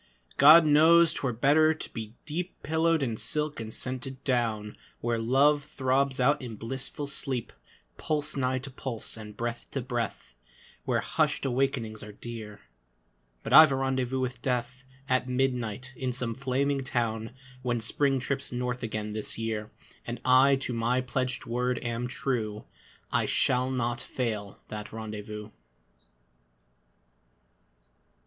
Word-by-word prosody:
God 155 Hz, +4 st, +9 dB
knows 160 Hz, +3 st, +6 dB
'twere 135 Hz, -, -1 dB
better 150 Hz, +7 st, +4 dB
to -, -, -8 dB
be 110 Hz, -1 st, -6 dB
deep 170 Hz, +4 st, -5 dB
Pillowed 160 Hz, -1 st, +2 dB
in 115 Hz, -4 st, -2 dB
silk 150 Hz, +2 st, -2 dB
and 110 Hz, -1 st, -6 dB
scented 130 Hz, +2 st, -4 dB
down, 115 Hz, -5 st, 0 dB, 0.2 s
Where 120 Hz, -1 st, -1 dB
Love 140 Hz, +5 st, +3 dB
throbs 135 Hz, -1 st, 0 dB
out 140 Hz, +4 st, +3 dB
in 120 Hz, -3 st, -6 dB
blissful 130 Hz, +6 st, -4 dB
sleep, 135 Hz, -3 st, -2 dB, 0.4 s
Pulse 150 Hz, -1 st, -1 dB
nigh 130 Hz, -1 st, +1 dB
to 135 Hz, +1 st, -6 dB
pulse, 130 Hz, -3 st, -4 dB
and 105 Hz, -2 st, -10 dB
breath 120 Hz, 0 st, -4 dB
to 135 Hz, -, -3 dB
breath, 120 Hz, -, -4 dB, 0.5 s
Where -, -, +1 dB
hushed -, -, 0 dB
awakenings 125 Hz, -4 st, -1 dB
are 105 Hz, -, -8 dB
dear... 105 Hz, -2 st, -8 dB, 0.8 s
But -, -, -3 dB
I've 155 Hz, -1 st, +10 dB
a -, -, +2 dB
rendezvous 130 Hz, -1 st, 0 dB
with 125 Hz, -1 st, -3 dB
Death 125 Hz, 0 st, -2 dB, 0.2 s
At 130 Hz, -1 st, +1 dB
midnight 125 Hz, -1 st, -1 dB
in 130 Hz, 0 st, -2 dB
some 125 Hz, -2 st, -2 dB
flaming 135 Hz, +2 st, 0 dB
town, 115 Hz, -2 st, -2 dB, 0.3 s
When 120 Hz, -2 st, 0 dB
Spring 135 Hz, +4 st, +1 dB
trips 140 Hz, +2 st, -3 dB
north 125 Hz, 0 st, -2 dB
again 105 Hz, -2 st, -3 dB
this 110 Hz, 0 st, -1 dB
year, 110 Hz, -1 st, -3 dB, 0.4 s
And 120 Hz, 0 st, -4 dB
I 130 Hz, +2 st, +6 dB
to 125 Hz, -, -2 dB
my 120 Hz, +2 st, +1 dB
pledged 130 Hz, 0 st, -2 dB
word 125 Hz, +1 st, 0 dB
am 120 Hz, 0 st, -2 dB
true, 115 Hz, -5 st, -2 dB, 0.5 s
I -, -, +1 dB
shall 125 Hz, +1 st, +2 dB
not 120 Hz, -2 st, -1 dB
fail 110 Hz, -6 st, -4 dB
that 105 Hz, 0 st, -6 dB
rendezvous. 105 Hz, -1 st, -7 dB
125 Hz, 140 wpm, -28 LUFS, 115-135 Hz, 0.8 s, I've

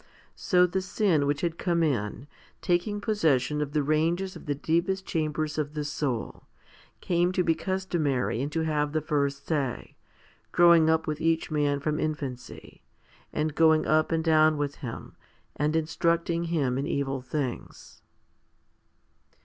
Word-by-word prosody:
So 180 Hz, -2 st, +3 dB
the 185 Hz, +2 st, -1 dB
sin 185 Hz, -6 st, +1 dB
which 145 Hz, 0 st, 0 dB
had 170 Hz, -1 st, -2 dB
come 170 Hz, -2 st, +1 dB
in, 120 Hz, -4 st, -1 dB, 0.3 s
taking 180 Hz, +4 st, 0 dB
possession 150 Hz, -, +1 dB
of 145 Hz, -1 st, -3 dB
the 150 Hz, -2 st, +1 dB
ranges 165 Hz, +6 st, 0 dB
of -, -, -11 dB
the 145 Hz, -, 0 dB
deepest 170 Hz, +6 st, -1 dB
chambers 155 Hz, -1 st, -2 dB
of 150 Hz, 0 st, -3 dB
the 150 Hz, -, -2 dB
soul, 145 Hz, -5 st, -3 dB, 0.6 s
came 175 Hz, 0 st, +1 dB
to 185 Hz, -, +1 dB
be 165 Hz, -, +3 dB
customary 160 Hz, -9 st, -1 dB
and 145 Hz, +2 st, -3 dB
to 165 Hz, +2 st, -1 dB
have 150 Hz, -2 st, -1 dB
the 155 Hz, -, 0 dB
first 140 Hz, -2 st, -1 dB
say, 140 Hz, -6 st, -2 dB, 0.6 s
growing 170 Hz, -2 st, +6 dB
up 160 Hz, 0 st, +2 dB
with 155 Hz, 0 st, -3 dB
each 165 Hz, 0 st, 0 dB
man 145 Hz, -2 st, +1 dB
from 150 Hz, +2 st, -2 dB
infancy, 140 Hz, -5 st, -5 dB, 0.5 s
and 155 Hz, 0 st, -1 dB
going 160 Hz, 0 st, +4 dB
up 155 Hz, +1 st, +2 dB
and 165 Hz, -1 st, +1 dB
down 155 Hz, -1 st, +4 dB
with 145 Hz, -1 st, -3 dB
him, 120 Hz, -5 st, -8 dB, 0.4 s
and 150 Hz, +2 st, 0 dB
instructing 170 Hz, +1 st, 0 dB
him 140 Hz, -7 st, 0 dB
in 140 Hz, -, -2 dB
evil 135 Hz, -1 st, -2 dB
things. 130 Hz, -1 st, -5 dB
155 Hz, 150 wpm, -27 LUFS, 145-170 Hz, 0.6 s, growing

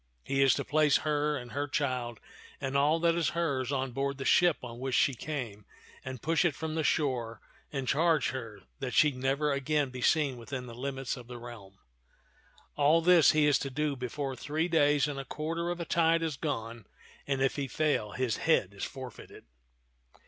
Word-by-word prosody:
He 135 Hz, 0 st, 0 dB
is 135 Hz, -3 st, +5 dB
to -, -, -3 dB
place 150 Hz, -1 st, +3 dB
her 150 Hz, 0 st, +1 dB
and 120 Hz, -2 st, -8 dB
her 145 Hz, +1 st, -2 dB
child 125 Hz, -5 st, -2 dB, 0.4 s
and 135 Hz, -1 st, -3 dB
all 150 Hz, +4 st, +3 dB
that 170 Hz, -1 st, +4 dB
is 165 Hz, -2 st, +1 dB
hers 140 Hz, -6 st, 0 dB
on 135 Hz, -2 st, -1 dB
board 140 Hz, +2 st, -2 dB
the 135 Hz, -, -5 dB
ship 175 Hz, +1 st, +4 dB
on 120 Hz, -1 st, -8 dB
which 130 Hz, -1 st, -2 dB
she 140 Hz, -, +3 dB
came 125 Hz, -6 st, -5 dB, 0.4 s
and 130 Hz, -3 st, -7 dB
push 165 Hz, 0 st, +2 dB
it 165 Hz, -6 st, +1 dB
from 160 Hz, 0 st, -4 dB
the 160 Hz, 0 st, -1 dB
shore 125 Hz, -7 st, 0 dB, 0.3 s
and 135 Hz, -3 st, -3 dB
charge 160 Hz, 0 st, +2 dB
her 115 Hz, -5 st, -7 dB, 0.2 s
that 135 Hz, -2 st, -4 dB
she 150 Hz, -3 st, +5 dB
never 135 Hz, +3 st, 0 dB
again 140 Hz, 0 st, 0 dB
be 125 Hz, 0 st, -7 dB
seen 140 Hz, -2 st, +2 dB
within 125 Hz, +2 st, -6 dB
the 120 Hz, -, -9 dB
limits 135 Hz, +1 st, -4 dB
of 120 Hz, -1 st, -11 dB
the 125 Hz, 0 st, -8 dB
realm. 115 Hz, -5 st, -11 dB, 1.0 s
All 150 Hz, +3 st, +4 dB
this 175 Hz, -2 st, +6 dB
he 155 Hz, -1 st, +4 dB
is 145 Hz, -2 st, +4 dB
to 135 Hz, -, -3 dB
do 145 Hz, +2 st, -1 dB
before 135 Hz, +2 st, -4 dB
three 155 Hz, +5 st, -2 dB
days 150 Hz, -4 st, +3 dB
and 145 Hz, -2 st, -4 dB
a -, -, -4 dB
quarter 165 Hz, +4 st, -3 dB
of 175 Hz, 0 st, -3 dB
a 170 Hz, -, -3 dB
tide 165 Hz, 0 st, +2 dB
have 155 Hz, -4 st, -3 dB
gone; 115 Hz, -, -4 dB, 0.4 s
and 135 Hz, -1 st, 0 dB
if 135 Hz, 0 st, +1 dB
he 140 Hz, -2 st, -2 dB
fail, 145 Hz, -6 st, 0 dB
his 125 Hz, -4 st, -1 dB
head 105 Hz, -, +2 dB
is 100 Hz, -, -7 dB
forfeited." 130 Hz, -5 st, -8 dB
140 Hz, 200 wpm, -30 LUFS, 125-155 Hz, 1.0 s, this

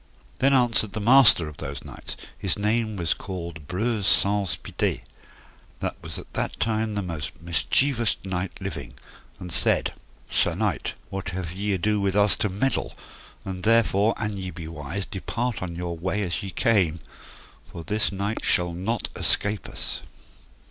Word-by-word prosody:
Then 135 Hz, +1 st, +4 dB
answered 115 Hz, -5 st, +2 dB
the 110 Hz, -, -2 dB
master 115 Hz, -, +7 dB
of 75 Hz, -1 st, -9 dB
those 70 Hz, -3 st, -5 dB
knights, -, -, -8 dB, 0.2 s
his -, -, -1 dB
name 110 Hz, +1 st, +1 dB
was 85 Hz, -4 st, +1 dB
called 85 Hz, -5 st, -7 dB
Breuse 105 Hz, +3 st, 0 dB
Saunce 100 Hz, -5 st, +2 dB
Pité, -, -, -2 dB, 0.8 s
that -, -, -2 dB
was -, -, -6 dB
at -, -, -11 dB
that -, -, -2 dB
time 110 Hz, -1 st, 0 dB
the 100 Hz, -, -1 dB
most 85 Hz, -4 st, -5 dB
mischievoust 115 Hz, -, +3 dB
knight 95 Hz, -1 st, -2 dB
living, 60 Hz, +2 st, -6 dB, 0.4 s
and 90 Hz, -1 st, -7 dB
said -, -, +2 dB, 0.3 s
thus: -, -, -3 dB
Sir 85 Hz, -, +3 dB
knight, 100 Hz, -5 st, -1 dB, 0.2 s
what 95 Hz, -1 st, -3 dB
have 90 Hz, -3 st, -3 dB
ye 100 Hz, +3 st, -1 dB
ado 105 Hz, +3 st, +1 dB
with 100 Hz, -1 st, +1 dB
us 105 Hz, 0 st, +5 dB
to 105 Hz, -, 0 dB
meddle? 105 Hz, +8 st, 0 dB, 0.5 s
and 95 Hz, -1 st, -4 dB
therefore, 110 Hz, 0 st, +4 dB
an 105 Hz, -1 st, -2 dB
ye 95 Hz, -1 st, -4 dB
be 85 Hz, -2 st, -7 dB
wise, 80 Hz, +4 st, -4 dB
depart 110 Hz, +5 st, -3 dB
on 85 Hz, -2 st, -4 dB
your 85 Hz, 0 st, -3 dB
way 95 Hz, +5 st, -1 dB
as 85 Hz, -3 st, -2 dB
ye 100 Hz, -, -5 dB
came, 95 Hz, -5 st, +2 dB, 0.7 s
for 85 Hz, -, -7 dB
this 105 Hz, +5 st, +1 dB
knight 100 Hz, +3 st, -2 dB
shall 90 Hz, -1 st, +3 dB
not 100 Hz, +7 st, -1 dB
escape 100 Hz, 0 st, +1 dB
us. -, -, -3 dB
100 Hz, 165 wpm, -25 LUFS, 85-110 Hz, 0.8 s, master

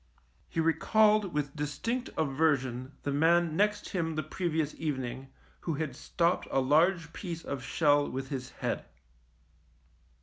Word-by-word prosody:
He -, -, -3 dB
recalled 210 Hz, +5 st, +3 dB
with 145 Hz, -2 st, -2 dB
dis 150 Hz, -1 st, -3 dB
tinct 245 Hz, +2 st, -2 dB
aversion 135 Hz, -3 st, +1 dB
the 145 Hz, -, -1 dB
man 165 Hz, +2 st, +3 dB
next 210 Hz, +2 st, +1 dB
him 165 Hz, -4 st, -1 dB
the 155 Hz, -, -1 dB
previous 160 Hz, -1 st, -1 dB
evening 130 Hz, -3 st, -3 dB, 0.3 s
who 165 Hz, -, -2 dB
had 145 Hz, -3 st, -3 dB
stopped 170 Hz, +4 st, 0 dB
a -, -, +2 dB
large 165 Hz, +5 st, +3 dB
piece 170 Hz, -4 st, -5 dB
of 140 Hz, -2 st, -4 dB
shell 145 Hz, -1 st, +3 dB
with 135 Hz, +1 st, -4 dB
his 130 Hz, -2 st, -4 dB
head. -, -, -3 dB
155 Hz, 140 wpm, -30 LUFS, 140-170 Hz, 0.3 s, recalled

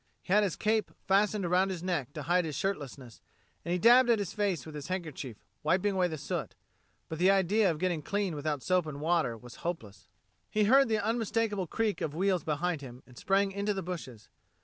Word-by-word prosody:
He 185 Hz, -, -1 dB
had 210 Hz, -, +6 dB
his 200 Hz, -5 st, 0 dB
cape 215 Hz, -2 st, +1 dB, 0.2 s
fastened 200 Hz, 0 st, +2 dB
around 180 Hz, +2 st, +2 dB
his 180 Hz, -3 st, -5 dB
neck 170 Hz, -8 st, -2 dB
to -, -, -6 dB
hide 180 Hz, +1 st, +2 dB
his 155 Hz, -3 st, -4 dB
shirtlessness, 140 Hz, -, -4 dB, 0.4 s
and 170 Hz, -, -4 dB
he 180 Hz, -, +2 dB
dabbed 240 Hz, +6 st, +6 dB
at 235 Hz, -, +5 dB
his 200 Hz, -4 st, -3 dB
face 200 Hz, -8 st, -1 dB
with 155 Hz, -, -9 dB
his 150 Hz, -1 st, -7 dB
handkerchief, 155 Hz, -, -5 dB, 0.2 s
wiping 190 Hz, +6 st, +1 dB
away 185 Hz, -1 st, +2 dB
the 160 Hz, -2 st, -5 dB
soot. 140 Hz, -, -4 dB, 0.5 s
But 160 Hz, -, -6 dB
the 185 Hz, +2 st, +5 dB
idea 195 Hz, +2 st, +3 dB
of 160 Hz, -, -1 dB
getting 175 Hz, -1 st, -1 dB
clean 200 Hz, +2 st, -1 dB
without 150 Hz, -2 st, -3 dB
soap 180 Hz, -3 st, +1 dB
and 145 Hz, -2 st, -6 dB
warm -, -, -7 dB
water 155 Hz, -10 st, +1 dB
was 120 Hz, +2 st, -13 dB
hopeless. 105 Hz, -, -6 dB, 0.4 s
He 215 Hz, -, +1 dB
heard 270 Hz, +6 st, +5 dB
the 220 Hz, -, +2 dB
unmistakable 220 Hz, -2 st, -1 dB
creak 220 Hz, +3 st, -1 dB
of 150 Hz, -1 st, -3 dB
wheels 185 Hz, 0 st, +1 dB
behind 160 Hz, +1 st, -1 dB
him, 125 Hz, -2 st, -10 dB
and 125 Hz, -, -18 dB
sprang 195 Hz, +7 st, +1 dB
into 200 Hz, +1 st, -1 dB
the 190 Hz, -, -3 dB
bushes. 150 Hz, -11 st, -7 dB
180 Hz, 215 wpm, -30 LUFS, 150-200 Hz, 0.5 s, had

